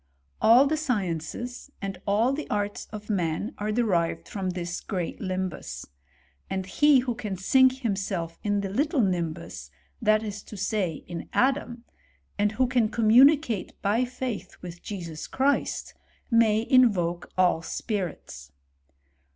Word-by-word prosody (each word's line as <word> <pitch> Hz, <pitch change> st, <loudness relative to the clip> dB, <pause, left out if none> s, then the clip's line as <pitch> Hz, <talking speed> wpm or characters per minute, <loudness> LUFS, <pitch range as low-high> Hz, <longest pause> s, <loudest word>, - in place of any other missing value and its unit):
All 240 Hz, +5 st, +7 dB
the 310 Hz, +2 st, +1 dB
sci« 250 Hz, -10 st, 0 dB
ences, 180 Hz, -, -5 dB
and 195 Hz, -2 st, -5 dB
all 220 Hz, +6 st, +3 dB
the 300 Hz, +2 st, -5 dB
arts 205 Hz, 0 st, -2 dB
of 210 Hz, -1 st, -8 dB
man, 185 Hz, -, -1 dB
are 210 Hz, +1 st, -1 dB
derived 200 Hz, -8 st, 0 dB
from 195 Hz, -2 st, -3 dB
this, 175 Hz, -1 st, -4 dB
great 180 Hz, -5 st, -4 dB
limbus; 185 Hz, -2 st, -4 dB, 0.6 s
and 190 Hz, -1 st, -2 dB
he 285 Hz, +6 st, +4 dB
who 250 Hz, -1 st, -2 dB
can 215 Hz, -5 st, -5 dB
sink 260 Hz, +7 st, +4 dB
himself 195 Hz, -7 st, -2 dB
in 205 Hz, -1 st, +1 dB
the 195 Hz, -, -3 dB
little 290 Hz, -, 0 dB
limhus, 165 Hz, -, -3 dB, 0.3 s
that 215 Hz, +1 st, +3 dB
is 205 Hz, -1 st, -5 dB
to 210 Hz, -, -9 dB
say, 190 Hz, -4 st, -1 dB
in 170 Hz, -1 st, -7 dB
Adam, 250 Hz, -3 st, +1 dB, 0.5 s
and 210 Hz, +1 st, +1 dB
who 255 Hz, +4 st, +2 dB
can 240 Hz, -3 st, +2 dB
commu 230 Hz, +3 st, +6 dB
nicate 280 Hz, -10 st, -2 dB
by 215 Hz, +5 st, +2 dB
faith 250 Hz, -5 st, -5 dB
with 175 Hz, -1 st, -8 dB
Jesus 170 Hz, -6 st, -6 dB
Christ, 275 Hz, +2 st, 0 dB, 0.4 s
may 225 Hz, -1 st, +4 dB
invoke 185 Hz, -10 st, +3 dB
all 180 Hz, -3 st, +3 dB
spirits. 170 Hz, -, -5 dB
205 Hz, 145 wpm, -26 LUFS, 185-245 Hz, 0.6 s, All